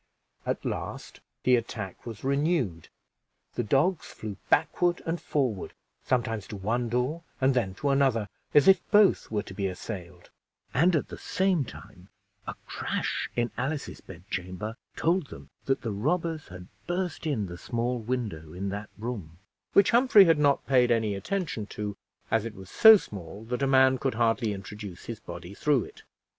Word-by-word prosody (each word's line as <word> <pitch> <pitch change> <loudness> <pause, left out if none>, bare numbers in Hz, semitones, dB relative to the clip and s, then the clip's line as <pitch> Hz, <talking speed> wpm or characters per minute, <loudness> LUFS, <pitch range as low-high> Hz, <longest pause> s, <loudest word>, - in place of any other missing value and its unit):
At - - -2
last - - -5 0.2
the 125 - +5
attack 110 -4 -4
was 115 -3 -7
renewed; 140 - 0 0.6
the - - -1
dogs 145 - +1
flew 105 -3 -7
backward 175 0 +2
and 165 +1 -2
forward, 125 -10 -1 0.3
sometimes 115 -5 -1
to 105 - -7
one 115 +5 -1
door 125 +8 0 0.2
and 135 +1 +3
then 105 -7 0
to 140 - -1
another, 135 -6 +2 0.2
as 145 - +5
if 190 -2 +7
both 205 -2 +5
were 105 -2 -1
to 95 - -10
be 100 0 -1
assailed; 90 -1 -7 0.4
and 170 +7 +4
at 150 - 0
the - - -8
same 185 -6 +1
time 100 -4 -13 0.4
a - - -4
crash - - -2
in 120 -1 0
Alice's 140 +3 -3
bedchamber 95 +4 -6 0.2
told 170 -1 +1
them - - -12
that 135 -1 0
the 115 - -2
robbers 160 - -1
had 90 -1 -10 0.2
burst 175 -2 -2
in 120 -9 0
the 85 -1 -8
small 120 +1 -1
window 110 -10 -4
in 95 +2 -3
that 100 +1 -5
room, 105 -8 -6 0.4
which 200 - +6
Humphrey 235 -4 +7
had 165 -3 +4
not 145 -1 +3
paid 125 -2 +4
any 110 -3 +2
attention 115 - -3
to, 105 -1 -5 0.4
as 115 -2 +3
it 115 -2 -6
was 95 -1 -11
so 220 -1 +9
small 100 - -9
that 125 +3 -3
a 135 - +2
man 130 -1 +5
could 135 -3 -1
hardly 115 -1 +2
introduce 100 -1 -8
his 115 -1 -6
body 85 -2 -9
through 140 +1 +2
it. - - -13
120 Hz, 170 wpm, -28 LUFS, 100-145 Hz, 0.6 s, so